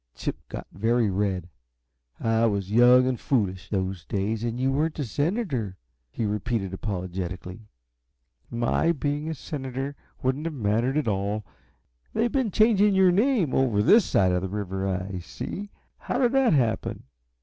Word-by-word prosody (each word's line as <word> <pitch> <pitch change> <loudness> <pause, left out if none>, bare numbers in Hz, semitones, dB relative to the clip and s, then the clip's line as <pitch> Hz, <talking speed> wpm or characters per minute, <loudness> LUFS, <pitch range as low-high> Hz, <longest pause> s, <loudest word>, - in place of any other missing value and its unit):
Chip - - -3
got - - -6
very 115 +2 +1
red. 95 -2 -1 0.7
"I 115 0 +2
was 100 -2 -2
young 125 +3 +6
and 130 -2 -1
foolish, 95 -8 -1
those 95 -3 -2
days, 105 +5 -2
and 120 +1 -2
you 130 +1 +2
weren't 155 +3 0
a 145 - -2
senator," 145 - -1 0.3
he 110 - -3
repeated, 105 -1 -2
apologetically. 95 +1 -5 0.8
"My 120 +8 +1
being 145 +1 -2
a 160 - -3
senator 135 -1 -5 0.3
wouldn't 130 +4 0
have 165 -2 -3
mattered 115 +4 +1
at 150 - 0
all. 100 0 -1 0.7
They've 235 0 +1
been 260 -5 +1
changing 210 -1 +4
your 190 -1 +6
name, 205 - +2
over 115 -6 +2
this 215 - +6
side 95 - +2
the 90 +1 0
river, 95 -1 -3
I 95 0 -3
see. 200 - -6 0.3
How - - -2
did 250 -2 +3
that 270 -6 +4
happen?" 120 -6 0
115 Hz, 150 wpm, -26 LUFS, 100-150 Hz, 0.8 s, young